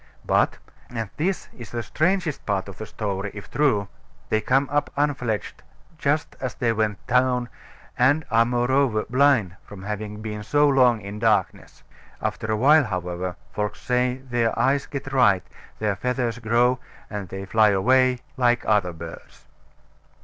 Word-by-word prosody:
But - - +2 0.3
and 115 -4 -4
this 185 +5 -1
is 120 -3 -10
the 120 -1 -4
strangest 170 - 0
part 100 -2 0
of 100 -1 -10
the 110 - -6
story, 100 -2 -3
if 100 -1 -9
true 115 -9 +2 0.4
they 110 - +2
come 135 +5 +2
up 145 0 +1
unfledged 125 -9 -1 0.4
just 145 +1 0
as 130 -2 -4
they 115 -2 +1
went 105 -2 -1
down, 125 0 +2 0.5
and 140 +5 +3
are 115 0 +5
moreover 120 -1 +1
blind 125 -8 +3
from 100 -2 -11
having 105 0 -5
been 105 -1 -5
so 145 +7 +3
long 125 -5 +4
in 100 +1 -7
darkness. 105 -4 0 0.4
After 110 - -3
a 110 - +1
while, 145 +5 +5
however, 90 -2 -3 0.2
folks 105 0 -3
say 125 0 +1
their 120 -3 -1
eyes 140 +1 +2
get 135 -1 -6
right, 105 -8 +4 0.3
their 105 -2 0
feathers 125 0 -2
grow, 120 +2 +2 0.3
and 100 -4 -6
they 95 +1 -6
fly 110 +2 +4
away 125 +6 +3 0.2
like 120 -1 +2
other 100 -5 +2
birds. 80 - -11
115 Hz, 155 wpm, -24 LUFS, 105-130 Hz, 0.5 s, are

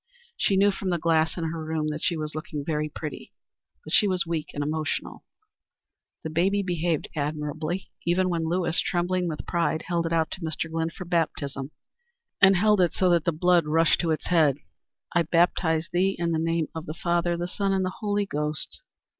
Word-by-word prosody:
She 200 - +1
knew 200 +1 +5
from 190 -1 -4
the 175 - +1
glass 160 0 +2
in 170 - -2
her 160 0 -3
room 155 -1 -1
that 150 0 -4
she 170 - +1
was 155 -1 -4
looking 155 -2 -5
very 150 -1 -1
pretty. 150 0 -7 0.5
But - - -7
she 210 - +5
was 185 -3 0
weak 165 -2 -3
and 145 - -3
emotional. 155 +1 -3 1.0
The 160 - -4
baby 195 +5 +2
behaved 175 -3 -1
admirably, 155 +4 -3
even 180 +2 +2
when 165 -2 -1
Lewis, 175 -1 0
trembling 180 0 0
with 155 -2 -4
pride, 170 -2 0
held 170 -1 +1
it - - -4
out 165 -1 +1
to 190 - -6
Mr. 160 0 -3
Glynn 165 0 -1
for 180 +2 -9
baptism 145 -5 -1 0.7
and 190 0 +8
held 210 +1 +4
it 175 - +2
so 185 -1 +2
that 170 -1 +3
the 170 - +3
blood 170 0 +3
rushed 165 +1 +3
to 170 - -1
its 155 - -1
head. 155 -6 +3 0.6
"I 175 - +4
baptize 165 0 +2
thee 190 +2 +2
in 170 -1 0
the 160 - +1
name 165 -1 0
of 160 0 -6
the 155 - -5
Father, 175 0 0
the 175 +1 -2
Son, 195 +2 -1
and 190 -1 +1
the 185 - -5
Holy 205 -1 0
Ghost." 150 - -3
170 Hz, 200 wpm, -26 LUFS, 155-180 Hz, 1.0 s, and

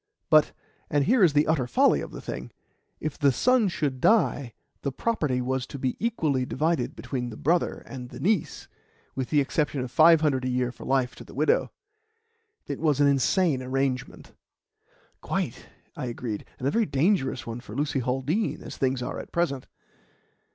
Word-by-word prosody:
But - - +6 0.4
and 145 -1 +2
here 240 -1 +4
is 165 -5 +5
the 145 +1 +4
utter 145 -6 +1
folly 120 - +3
of - - -6
the - - -9
thing - - -6 0.5
if 155 -2 -4
the 140 -2 +4
son 245 - +3
should 145 -7 -2
die, 145 - +2 0.3
the 140 - -2
property 140 - -1
was 130 0 -2
to 140 - -7
be 130 -1 -1
equally 160 - 0
divided 150 +1 -1
between 125 -3 -4
the 110 - -9
brother 170 +4 0
and 125 -2 -8
the - - -10
niece, 200 -2 0 0.5
with 130 -2 -3
the 150 - +3
exception 145 0 0
of 125 -1 -5
five 160 +2 +6
hundred 140 -4 +1
a 130 - -1
year 125 -1 0
for - - -12
life 130 -2 +1
to - - -9
the - - -14
widow. 150 +3 +2 1.0
It - - -5
was 150 -4 +1
an 145 - +5
insane 140 +2 +2
arrangement." 130 0 -3 0.9
"Quite," - - -3 0.3
I - - -4
agreed, 115 -3 -4
"and 130 - -2
a - - +2
very 225 +2 +1
dangerous 140 -3 +1
one 115 +1 -5
for 115 -3 -10
Lucy 145 0 0
Haldean, 135 - -1
as - - -8
things 130 -1 0
are - - -4
at - - -9
present." 155 -7 -1
140 Hz, 180 wpm, -26 LUFS, 125-160 Hz, 1.0 s, But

